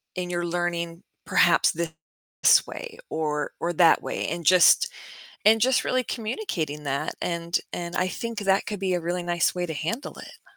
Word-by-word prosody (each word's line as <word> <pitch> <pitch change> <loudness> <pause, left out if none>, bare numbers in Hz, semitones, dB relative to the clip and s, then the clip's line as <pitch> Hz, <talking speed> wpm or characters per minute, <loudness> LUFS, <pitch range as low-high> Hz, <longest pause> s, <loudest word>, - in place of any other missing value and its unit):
in 180 -1 -3
your 175 0 -2
learning, 170 0 -2 0.2
perhaps, - - +4
this 160 -1 0
way 470 -2 -8
or 150 -2 -2
or 175 +1 -1
that 165 0 +5
way, - - -3
and 170 0 -5
just 180 0 +6 0.6
and 220 +1 +6
just 255 +2 +3
really 255 -1 0
communicating 195 - -4
that, 140 +2 -2
and 170 0 -1
and 170 0 -5
I 185 0 +1
think 230 +2 -5
that 195 0 +1
could 210 -2 -4
be 190 -1 0
a 175 - 0
really 175 +1 -2
nice 175 0 0
way 180 0 -2
to 160 - -4
handle 215 - -4
it. - - -12
175 Hz, 175 wpm, -25 LUFS, 165-195 Hz, 0.6 s, just